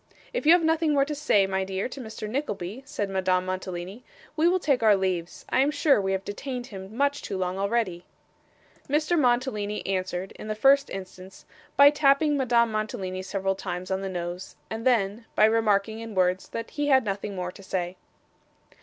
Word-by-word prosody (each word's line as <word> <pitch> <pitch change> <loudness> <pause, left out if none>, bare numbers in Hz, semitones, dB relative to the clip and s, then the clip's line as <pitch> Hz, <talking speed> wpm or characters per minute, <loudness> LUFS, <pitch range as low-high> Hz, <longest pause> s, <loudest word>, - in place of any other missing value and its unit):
'If - - -2
you 325 - +9
have 350 -1 +4
nothing 320 -1 +2
more 275 -1 +4
to 300 - -4
say, 285 -9 +3
my 190 0 -1
dear, 190 +1 -2
to 265 - -8
Mr. 220 -2 -7
Nickleby,' 215 -3 -4
said 205 -7 -2
Madame 185 -1 +1
Mantalini, 185 +3 -5 0.3
'we 320 +2 +3
will 360 +2 +4
take 280 -8 +1
our 215 -2 +6
leaves. 185 -3 -2
I - - +2
am 275 +2 +4
sure 290 -5 +3
we 195 0 -1
have 190 0 -3
detained 250 +4 -5
him 195 -1 -9
much 285 +1 +1
too 195 - -4
long 185 0 -2
already.' 200 -4 -1 0.9
Mr. 305 +4 +2
Mantalini 240 -7 0
answered, 185 -1 -2
in - - -8
the 215 - -2
first 275 +5 +4
instance, 185 0 -9 0.3
by 280 +1 +9
tapping 295 0 +3
Madame 240 -4 +2
Mantalini 195 -3 -3
several 195 0 -1
times 185 -1 -5
on 190 0 0
the 195 - -3
nose, 175 0 -5 0.2
and 225 +2 -2
then, 225 -2 +1
by 215 - +6
remarking 220 -1 +2
in 225 -2 -7
words 185 0 +1
that 230 0 -6
he 290 -1 -2
had 265 -2 +5
nothing 200 0 -3
more 180 -1 -3
to 195 - -14
say. 185 -2 -3
210 Hz, 190 wpm, -26 LUFS, 190-270 Hz, 0.9 s, you